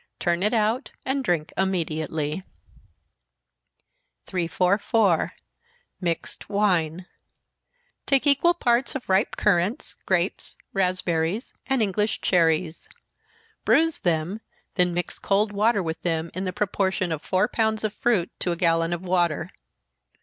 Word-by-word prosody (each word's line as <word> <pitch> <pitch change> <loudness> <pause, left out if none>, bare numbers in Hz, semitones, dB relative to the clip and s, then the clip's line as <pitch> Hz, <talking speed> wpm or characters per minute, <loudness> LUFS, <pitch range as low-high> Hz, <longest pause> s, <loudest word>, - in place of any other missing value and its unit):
Turn 175 0 0
it 210 +2 +2
out, 225 +3 +1 0.2
and 270 +1 0
drink 170 -7 -1
immediately. 160 -3 -1 1.8
344. 185 +2 +1 0.7
Mixed 170 +1 -3
Wine. 180 -5 +1 1.0
Take 275 0 +3
equal 290 +5 +4
parts 245 -4 +1
of 265 - -5
ripe 190 +2 +2
currants, 195 +3 +1
grapes, 185 0 -1 0.2
raspberries, 180 +1 0
and 265 -4 +2
English 210 +1 0
cherries. 165 -2 +1 0.7
Bruise 325 -1 +3
them, 175 +5 -1 0.3
then 180 -3 +2
mix 175 - -3
cold 205 +2 +1
water 205 0 +2
with 160 -1 -4
them, 165 -1 -1
in 185 +2 -3
the 185 - -1
proportion 190 -2 -1
of 155 -2 -2
four 185 +4 +1
pounds 220 -1 0
of 215 -1 -1
fruit 210 -8 +1
to 180 - 0
a - - 0
gallon 165 -1 +2
of 175 +1 -4
water. 175 -2 0
185 Hz, 120 wpm, -25 LUFS, 170-215 Hz, 1.8 s, equal